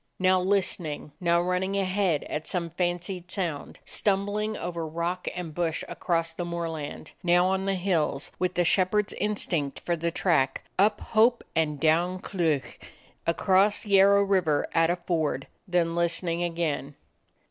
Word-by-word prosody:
Now 185 0 +3
listening, 180 -6 -1
now 170 -2 +3
running 180 +2 0
ahead 185 -5 +1
at 155 +1 -5
some 170 -2 -2
fancied 180 +1 -3
sound; 175 -7 -3
stumbling 205 +2 0
over 170 -1 -4
rock 170 +3 -3
and 175 -3 -5
bush 165 -1 -1
across 165 -2 -1
the 175 - -4
moorland; 165 -4 -5
now 175 0 +4
on 190 +1 0
the 195 0 +1
hills, 170 -6 -1
with 180 0 0
the 175 - +2
shepherd's 200 +4 +2
instinct 170 -9 -1
for 175 - 0
the 170 +1 -1
track; 155 -6 +1 0.2
up 210 +3 +3
hope 230 +2 +3
and 150 -3 0
down 170 +4 +2
cleuch; 165 -7 -2 0.5
across 190 +5 +3
Yarrow 200 0 +5
Water 180 -7 +2
at 165 0 +3
a 175 - +2
ford; 160 -6 -1 0.2
then 175 -2 +1
listening 170 0 0
again. 165 -5 -2
175 Hz, 145 wpm, -27 LUFS, 165-190 Hz, 0.5 s, Yarrow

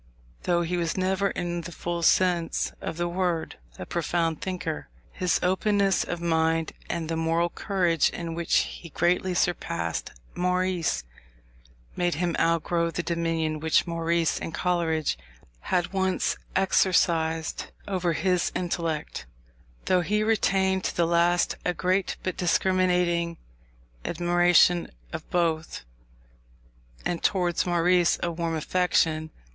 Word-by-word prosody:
Though 175 -1 +2
he 175 +2 -1
was 170 0 -1
never, 190 +1 +1
in 175 -1 -3
the 170 +1 -8
full 170 0 -4
sense 175 -1 +2
of - - -4
the 175 0 0
word, 175 -2 -2 0.2
a - - -6
profound 165 -1 -1
thinker, 175 - -4 0.2
his 180 -1 0
openness 195 +1 +2
of 175 - -4
mind, 165 -1 +1 0.2
and 170 -2 -2
the 165 - -2
moral 165 +1 +1
courage 175 -6 +1
in 170 -1 -5
which 170 0 0
he 170 - -7
greatly 180 +3 +1
surpassed 170 - -1 0.2
Maurice, 180 - 0 0.9
made 175 -2 0
him 175 +1 -1
outgrow 170 0 +1
the 170 +1 -3
dominion 165 -2 -1
which 160 +1 +2
Maurice 165 -1 0
and 165 - -5
Coleridge 165 - 0 0.4
had 175 - -1
once 190 -1 +1 0.2
exercised 165 -4 +2 0.2
over 180 -4 0
his 180 +2 +1
intellect; 165 - -3 0.6
though 185 -1 +3
he 210 +5 0
retained 190 -3 +2
to - - -2
the 170 - +3
last 170 +1 +2
a 180 - 0
great 185 +2 0
but 185 - -2
discriminating 180 -2 +1 0.7
admiration 175 0 +3 0.2
of - - -6
both, 165 -2 -1 1.2
and 175 - -1
towards 180 -3 +1
Maurice 175 0 +3
a 175 - 0
warm 165 0 -2
affection. 160 -1 +1
175 Hz, 125 wpm, -26 LUFS, 165-180 Hz, 1.2 s, though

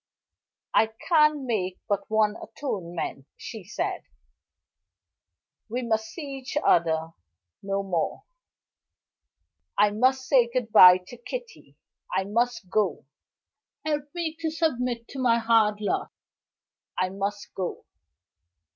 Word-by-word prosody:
"I 220 - +5 0.2
can 300 -4 +4
make 190 -7 -1
but 200 -1 -1
one 215 -1 +2
atonement," 175 - -5
she 220 -5 -8
said. 195 - -3 1.7
"We 250 +3 -2
must 220 -2 0
see 280 -1 -7
each 260 +2 -5
other 160 -1 +3 0.5
no 195 0 -2
more. 180 -4 -2 1.5
I 205 0 +5
must 260 +4 +2
say 250 -4 +5
good 240 -3 -2
by 180 -4 +10
to 245 - -11
Kitty 485 - -8 0.4
I 190 - +2
must 230 +1 -1
go. 190 -4 0 0.8
Help 295 -2 -1
me 330 -2 -2
to 325 -1 -1
submit 250 -7 -1
to 275 - -7
my 240 -3 +4
hard 225 -2 +3
lot 210 - -1 0.9
I 185 - +1
must 200 +2 -4
go." 185 -2 -4
225 Hz, 115 wpm, -26 LUFS, 195-260 Hz, 1.7 s, by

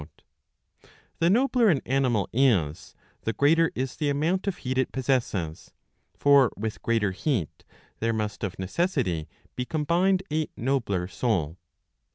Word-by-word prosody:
The 170 - +3
nobler 245 +1 +3
an 155 -7 +3
animal 125 -5 +1
is, 105 - +1 0.3
the 115 - -2
greater 160 +8 +3
is 130 0 -3
the 150 -2 0
amount 165 +8 0
of 195 - -1
heat 130 +1 -2
it 130 - 0
possesses. 120 - -2 0.4
For 140 -4 +5
with 110 +1 -4
greater 115 -4 +1
heat 100 - -2 0.4
there 115 +1 +1
must 105 -2 -3
of 100 -4 -3
neces 170 - -1
sity 80 -6 -3 0.3
be 125 - -2
combined 175 +6 +1
a 155 0 0
nobler 115 -8 -1
soul." 90 -7 -1
130 Hz, 140 wpm, -26 LUFS, 105-155 Hz, 0.4 s, For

